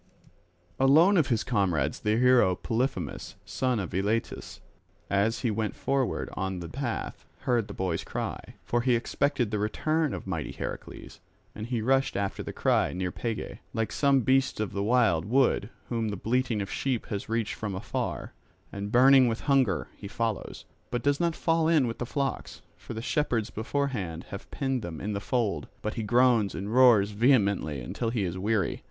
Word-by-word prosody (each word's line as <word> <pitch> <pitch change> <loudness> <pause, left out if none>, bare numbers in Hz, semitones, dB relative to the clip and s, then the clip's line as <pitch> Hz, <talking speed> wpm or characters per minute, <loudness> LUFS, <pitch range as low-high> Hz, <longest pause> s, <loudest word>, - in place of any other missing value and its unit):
Alone 155 +9 +6
of 160 -7 +3
his 115 -3 +1
comrades 90 - 0
the 105 0 +1
hero 120 -7 +5
Polyphemus, 120 +8 -3
son 130 -3 -1
of 95 - -5
Eilatus, 105 +5 -2 0.5
as 100 +3 +1
he 120 - +1
went 110 0 -2
forward 135 -2 -1
on 95 -1 -3
the 85 - -6
path, 120 0 -4 0.2
heard 120 -4 +1
the - - -8
boy's 90 -3 -2
cry, - - -5
for 120 - +1
he 125 0 +3
expected 120 0 0
the 105 - -1
return 155 +8 0
of - - -7
mighty 85 -5 -4
Heracles. - - -7 0.3
And 110 +1 -6
he 120 -3 -2
rushed 135 0 +2
after 100 -1 -2
the - - -5
cry, - - +1
near 90 0 -2
Pegae, 115 +3 -4 0.2
like 115 -2 -1
some 140 -2 +3
beast 130 0 +2
of 110 -2 -2
the 100 - -2
wild 110 -7 +3
wood 120 -2 +2 0.2
whom 115 -2 -1
the 100 - -4
bleating 115 0 0
of 95 - -8
sheep 130 -4 -1
has 100 +2 -4
reached 115 -1 -1
from 105 -3 -4
afar, 95 - -4 0.4
and 100 +1 -5
burning 130 +1 +7
with 115 -1 -2
hunger 125 - +2
he - - -9
follows, - - -3 0.2
but 120 -1 -2
does 145 0 +2
not 170 -2 +1
fall 165 -1 +1
in 160 -5 +4
with 115 -1 -4
the 120 - -3
flocks; 140 +1 -3
for 115 - -9
the 110 - -5
shepherds 120 -7 0
beforehand 110 - -2
have 100 - -8
penned 135 -3 -2
them 85 -6 -6
in 105 +2 -3
the 100 - -2
fold, 105 - -1 0.2
but 110 - -2
he 115 - -3
groans 120 -1 +3
and 100 +3 -4
roars 120 -5 +6
vehemently 100 - +2
until 115 - -3
he 115 -3 -1
is 90 -1 -2
weary. 100 0 0
115 Hz, 180 wpm, -28 LUFS, 100-130 Hz, 0.5 s, burning